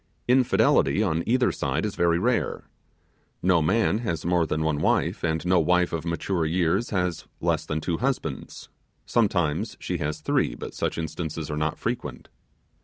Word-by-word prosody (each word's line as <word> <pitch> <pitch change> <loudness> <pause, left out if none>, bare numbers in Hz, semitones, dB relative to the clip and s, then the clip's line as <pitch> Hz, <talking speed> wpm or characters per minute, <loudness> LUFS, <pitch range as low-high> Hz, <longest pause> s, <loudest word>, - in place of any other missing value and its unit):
Infidelity 120 - +3
on 85 -5 0
either 125 +1 +3
side 70 +5 -1
is 105 - -2
very 85 -1 +2
rare. 120 +7 0 0.8
No 90 -2 +4
man 110 +5 +2
has 85 -10 -3
more 85 -2 +2
than 80 0 -1
one 80 -2 0
wife, - - +1
and 80 0 -1
no 90 0 +4
wife 90 +2 +2
of 85 -1 -3
mature 85 +1 -1
years 85 +6 +1
has 90 -4 -2
less - - 0
than 75 +1 -2
two 85 +1 -1
husbands, 125 - -3 0.4
sometimes 90 -9 0
she - - -3
has 75 +1 -2
three, - - 0
but - - -7
such - - -2
instances 80 -1 -4
are - - -2
not 75 0 -1
frequent. - - -4
85 Hz, 165 wpm, -25 LUFS, 80-95 Hz, 0.8 s, No